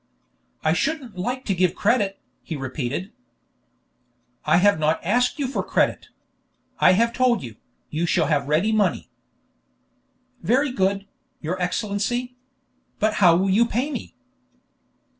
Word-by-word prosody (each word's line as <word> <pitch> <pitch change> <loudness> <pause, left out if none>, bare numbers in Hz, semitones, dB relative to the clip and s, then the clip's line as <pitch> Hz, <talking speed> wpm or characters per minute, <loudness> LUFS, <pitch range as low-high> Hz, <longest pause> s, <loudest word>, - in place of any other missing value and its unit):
"I 155 - +3
shouldn't 270 - -2
like 250 +8 -3
to 200 - 0
give 185 0 +1
credit," 205 -3 +1 0.2
he 160 - -6
repeated. 135 +6 -4 1.3
"I 155 +2 +4
have 200 -2 +4
not 155 +1 +1
asked 245 - +1
you 285 - -1
for 265 - -2
credit. - - 0 0.7
I 180 - +6
have 230 +4 +2
told 245 -5 +2
you, 115 -3 -9 0.3
you 165 +3 -1
shall - - +2
have 145 -3 0
ready 170 +9 +2
money." 205 -5 0 1.3
"Very 260 - +2
good, 195 -2 0 0.3
your 180 +4 -4
Excellency. 215 +7 -2 0.6
But 215 0 +1
how 175 -3 +7
will 190 +2 +1
you 230 +4 +4
pay 255 +6 -1
me?" - - -6
195 Hz, 135 wpm, -23 LUFS, 170-240 Hz, 1.3 s, how